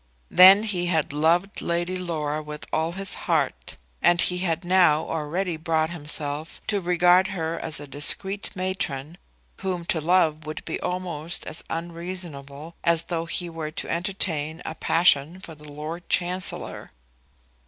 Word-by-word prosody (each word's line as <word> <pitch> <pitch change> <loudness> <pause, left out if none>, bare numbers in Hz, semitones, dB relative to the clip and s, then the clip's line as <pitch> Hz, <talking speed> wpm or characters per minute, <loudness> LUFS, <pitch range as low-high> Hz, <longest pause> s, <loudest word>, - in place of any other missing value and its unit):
Then 190 +3 +9
he 180 -5 -1
had 160 -5 0
loved 170 +6 +2
Lady 175 +2 -1
Laura 155 -4 -2
with 150 0 -8
all 160 +2 0
his 195 +1 -1 0.2
heart, - - 0 0.2
and 175 0 +4
he 180 +1 +2
had 170 -2 -1
now 175 -4 +4
already 165 +3 -2
brought 160 0 0
himself 150 -1 -4
to 205 -2 0
regard 180 +1 +4
her 165 -4 -3
as 155 -3 -4
a 145 - -8
discreet 190 +8 +1
matron 180 -4 -3 0.4
whom 185 -3 -3
to 165 -2 0
love 160 -2 +2
would 155 - -6
be - - -3
almost 175 -3 -3
as 155 - -7
unreasonable 165 -3 -6
as 170 -1 +3
though 165 0 -1
he 175 +1 -2
were 165 -2 -5
to 155 - -5
entertain 165 -3 -1
a - - -4
passion 165 0 +3
for 170 -3 -10
the 150 -1 -12
Lord 155 +4 -7
Chancellor. 180 +1 -1
170 Hz, 150 wpm, -25 LUFS, 155-180 Hz, 0.4 s, Then